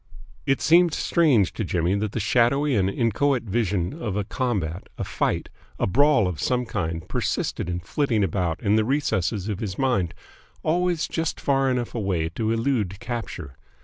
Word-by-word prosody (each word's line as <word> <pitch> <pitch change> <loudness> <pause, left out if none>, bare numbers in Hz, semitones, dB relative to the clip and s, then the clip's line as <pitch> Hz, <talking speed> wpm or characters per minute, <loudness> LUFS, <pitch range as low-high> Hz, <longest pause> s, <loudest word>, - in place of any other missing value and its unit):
It 135 - +2
seemed 170 0 +5
strange 135 - +3
to - - -3
Jimmy 90 -1 0
that 105 +1 -1
the - - -1
shadowy 125 +6 +2
and 95 -2 +2
inchoate 120 +5 +1
vision 100 -3 -1
of 105 -4 -2
a 105 - 0
combat, 100 - -2
a - - -2
fight, - - -1 0.3
a - - +1
brawl 135 0 +4
of 85 -5 -4
some 125 -1 +1
kind 85 -5 -3
persisted - - -2
in 90 0 -2
flitting 115 - 0
about 90 -2 -1
in 105 0 +3
the 110 - +3
recesses 110 -7 0
of 105 -3 -3
his 100 -4 -4
mind, 120 -11 0 0.5
always 175 0 +1
just 165 -1 -2
far 135 -1 +2
enough 125 -2 -1
away 95 -8 -1
to 110 +6 -2
elude 115 -5 0
capture. 115 - -6
110 Hz, 170 wpm, -24 LUFS, 95-135 Hz, 0.5 s, seemed